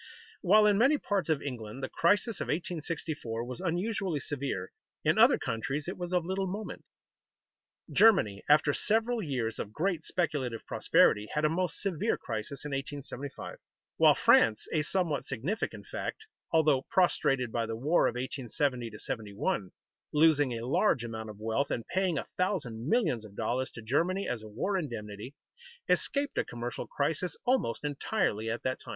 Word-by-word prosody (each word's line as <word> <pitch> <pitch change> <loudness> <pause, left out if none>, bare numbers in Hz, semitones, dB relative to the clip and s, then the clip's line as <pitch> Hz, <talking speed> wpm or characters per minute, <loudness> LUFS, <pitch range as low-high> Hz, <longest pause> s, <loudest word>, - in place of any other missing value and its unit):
While 210 +3 +6
in 205 -1 +4
many 275 +6 +5
parts 195 - -1
of 155 -3 +1
England 125 -2 -6
the - - 0
crisis 205 - +2
of - - -1
1864 155 -7 -3
was 125 +5 -6
unusually 185 -1 -1
severe, 135 -10 -3 0.3
in - - +3
other - - +7
countries 135 +7 -3
it 185 - -3
was 175 0 -5
of 180 -2 +1
little 190 +1 -1
moment. 205 +4 -6 1.1
Germany, 175 - +5
after 150 0 +5
several 225 +5 +1
years 125 - -2
of 105 - -4
great 170 - -1
speculative 140 -11 -2
prosperity, 105 +1 +3
had 150 0 +2
a - - +4
most 180 +2 -1
severe 190 -6 0
crisis 115 +5 -5
in 150 - -4
1875; 140 0 -6 0.4
while - - +6
France 110 -2 +4
(a 155 - +3
somewhat 155 -3 0
significant 140 - -3
fact), 440 - -5 0.3
although 155 -5 +4
prostrated 135 -9 +2
by 115 0 -1
the 115 - -3
war 150 +8 +3
of - - -2
1870 125 -2 -2
71, 105 -3 -3 0.4
losing 150 -3 +4
a 115 - -5
large 130 - +2
amount 110 -1 -5
of 105 -1 -10
wealth, 115 +6 0
and 115 - -2
paying 185 -3 +1
a - - -2
thousand 140 - -1
millions 165 - +2
of 105 -2 -12
dollars 125 +4 -1
to 115 - -9
Germany 170 - 0
as 120 -3 -2
a 110 - -10
war 190 - -1
indemnity, 110 - -6 0.5
escaped 285 0 +1
a - - +2
commercial 120 +1 -5
crisis 160 +5 -1
almost 245 - +1
entirely 145 - -1
at 115 - -3
that 130 0 -1
time. - - -12
145 Hz, 160 wpm, -30 LUFS, 115-180 Hz, 1.1 s, other